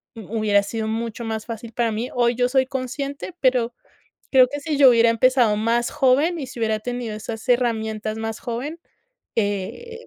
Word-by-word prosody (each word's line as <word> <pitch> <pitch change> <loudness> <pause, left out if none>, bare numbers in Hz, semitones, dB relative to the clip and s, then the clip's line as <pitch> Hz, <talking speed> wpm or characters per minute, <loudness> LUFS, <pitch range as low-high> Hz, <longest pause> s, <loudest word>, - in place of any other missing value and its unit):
hu 220 +1 -5
hubiera 205 -1 +3
sido 220 +1 -3
mucho 230 +1 -3
más 220 -1 -4
fácil 230 -1 -7
para 235 0 0
mí. 235 +4 -3
Hoy 240 -1 +2
yo 245 +1 +1
soy 260 0 +3
consciente, 275 +5 -5
pero 250 -3 +2 0.6
creo 255 -1 +7
que 290 - -5
si 300 -1 -2
yo 275 -2 +8
hubiera 230 -1 +5
empezado 240 -1 +3
más 230 +3 +1
joven 290 +6 +2
y 270 - -4
si 250 - -10
hubiera 220 -1 0
tenido 245 -1 -4
esas 220 +3 -7
herramientas 220 -3 0
más 225 0 -4
joven, 265 +8 -5 0.6
eh, 225 - -3
235 Hz, 180 wpm, -22 LUFS, 220-255 Hz, 0.6 s, yo